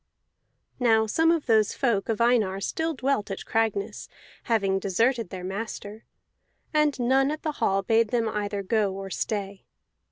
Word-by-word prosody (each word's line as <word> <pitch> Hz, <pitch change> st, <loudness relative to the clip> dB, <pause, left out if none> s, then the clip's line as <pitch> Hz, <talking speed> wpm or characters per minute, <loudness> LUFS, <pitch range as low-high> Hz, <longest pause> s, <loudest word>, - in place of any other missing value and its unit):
Now 225 Hz, -3 st, +4 dB
some 325 Hz, +9 st, +2 dB
of 330 Hz, -3 st, 0 dB
those 220 Hz, -3 st, +3 dB
folk 230 Hz, -7 st, 0 dB
of 220 Hz, -, 0 dB
Einar 230 Hz, -5 st, +2 dB
still 320 Hz, +10 st, -2 dB
dwelt 260 Hz, -5 st, -1 dB
at 195 Hz, -, -5 dB
Cragness, 215 Hz, -2 st, -1 dB, 0.4 s
having 200 Hz, -5 st, +1 dB
deserted 225 Hz, +3 st, +1 dB
their 185 Hz, 0 st, -7 dB
master, 205 Hz, +2 st, -6 dB, 0.7 s
and 300 Hz, -3 st, +2 dB
none 265 Hz, +3 st, +3 dB
at 305 Hz, +1 st, -4 dB
the 310 Hz, -, -1 dB
hall 195 Hz, 0 st, +2 dB
bade 225 Hz, +3 st, +3 dB
them 230 Hz, 0 st, 0 dB
either 205 Hz, -2 st, -3 dB
go 205 Hz, -1 st, 0 dB
or 195 Hz, 0 st, -7 dB
stay. 200 Hz, -2 st, -3 dB
220 Hz, 155 wpm, -26 LUFS, 200-245 Hz, 0.7 s, Now